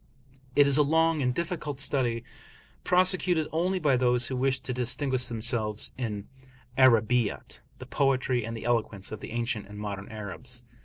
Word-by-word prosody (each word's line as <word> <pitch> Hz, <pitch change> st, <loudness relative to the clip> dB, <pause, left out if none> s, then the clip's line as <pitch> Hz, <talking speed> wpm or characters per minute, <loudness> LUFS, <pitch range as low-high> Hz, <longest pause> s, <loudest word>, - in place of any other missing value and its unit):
It 145 Hz, -, +7 dB
is 140 Hz, 0 st, +3 dB
a -, -, +6 dB
long 160 Hz, +1 st, +3 dB
and 125 Hz, -1 st, +2 dB
difficult 150 Hz, -2 st, -3 dB
study, 125 Hz, -5 st, 0 dB, 0.6 s
prosecuted 180 Hz, -3 st, +2 dB
only 180 Hz, +4 st, 0 dB
by 145 Hz, -7 st, +2 dB
those 125 Hz, -1 st, +3 dB
who 130 Hz, -, -1 dB
wish 130 Hz, +1 st, +1 dB
to 125 Hz, -, -3 dB
distinguish 125 Hz, +1 st, 0 dB
themselves 110 Hz, -2 st, -2 dB
in 105 Hz, -5 st, -4 dB, 0.5 s
"Arabiyat," 120 Hz, -3 st, +3 dB, 0.2 s
the -, -, -9 dB
poetry 130 Hz, -3 st, +1 dB
and 115 Hz, +1 st, -5 dB
the -, -, -8 dB
eloquence 110 Hz, -5 st, -1 dB
of 110 Hz, -, -5 dB
the -, -, -8 dB
ancient 115 Hz, -3 st, -2 dB
and 105 Hz, 0 st, -10 dB
modern 100 Hz, -1 st, -5 dB
Arabs. 115 Hz, +4 st, -7 dB
125 Hz, 160 wpm, -28 LUFS, 115-145 Hz, 0.6 s, It